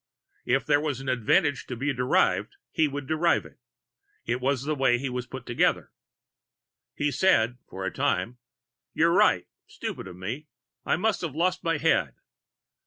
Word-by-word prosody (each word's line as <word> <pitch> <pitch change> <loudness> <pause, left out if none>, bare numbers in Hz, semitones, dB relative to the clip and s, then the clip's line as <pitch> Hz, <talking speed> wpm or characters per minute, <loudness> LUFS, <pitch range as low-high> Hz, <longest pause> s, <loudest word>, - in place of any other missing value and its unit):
If 135 +2 +2
there 145 -1 +3
was 145 -4 -2
an 135 0 -5
advantage 130 - +2
to 125 - -4
be 135 +4 -1
derived, 125 - +1 0.2
he 160 -3 +2
would 145 0 -5
derive 160 +4 +2
it. - - -16 0.7
It 125 - -1
was 135 0 0
the 155 +2 -1
way 130 -4 +3
he 135 +2 -3
was 125 0 -4
put 130 -1 -8
together. 120 - +1 1.0
He 145 0 0
said, 125 -6 +2
for 95 0 -4
time: 120 +1 -1 0.6
"You're 165 +1 +4
right. 90 - +4 0.2
Stupid - - -6
of 90 - -9
me. 115 +12 -6 0.4
I - - +3
must 220 +5 0
have 160 -5 -4
lost 180 +3 0
my 165 -2 +1
head!" 95 - +1
135 Hz, 165 wpm, -27 LUFS, 125-155 Hz, 1.0 s, You're